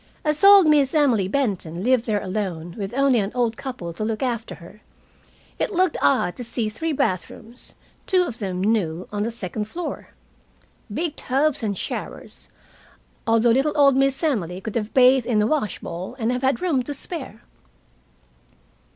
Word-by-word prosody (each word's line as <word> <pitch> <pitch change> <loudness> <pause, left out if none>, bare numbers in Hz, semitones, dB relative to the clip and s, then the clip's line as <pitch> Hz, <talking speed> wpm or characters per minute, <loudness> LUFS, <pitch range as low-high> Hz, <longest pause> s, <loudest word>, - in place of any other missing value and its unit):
As 300 +2 +1
old 400 -2 +9
Miss 295 -2 +3
Emily 250 -11 +3
Benton 190 - -2
lived 250 0 +2
there 210 -2 0
alone, 185 -4 -4
with 200 -1 -5
only 275 -3 +3
an 200 0 -2
old 235 -2 +1
couple 255 -11 -6
to 215 - -5
look 220 +3 -2
after 235 -3 -3
her, 190 +4 -15 0.8
it - - -1
looked 370 -3 +1
odd 175 +5 +2
to 245 - -5
see 230 -1 -2
three 320 +9 -3
bathrooms, 225 - -4 0.3
two 370 -1 +3
of 240 -10 -6
them 185 -3 -3
new, 185 -6 0
on 205 0 -3
the 220 - 0
second 210 -2 -5
floor. 340 +11 -6 0.8
Big 315 +7 -2
tubs 275 +2 0
and 205 -4 -2
showers, - - -6 0.8
although 230 +1 +4
little 270 +5 +2
old 280 -3 +5
Miss 270 +2 +1
Emily 190 - -1
could 210 +2 -6
have 220 -2 -2
bathed 255 -1 +5
in 235 -3 +1
the 210 - +3
washbowl 210 - -3
and 230 -1 0
have 250 0 -2
had 270 +6 0
room 310 -8 +1
to 285 +3 -5
spare. 270 - -7
235 Hz, 170 wpm, -23 LUFS, 205-275 Hz, 0.8 s, old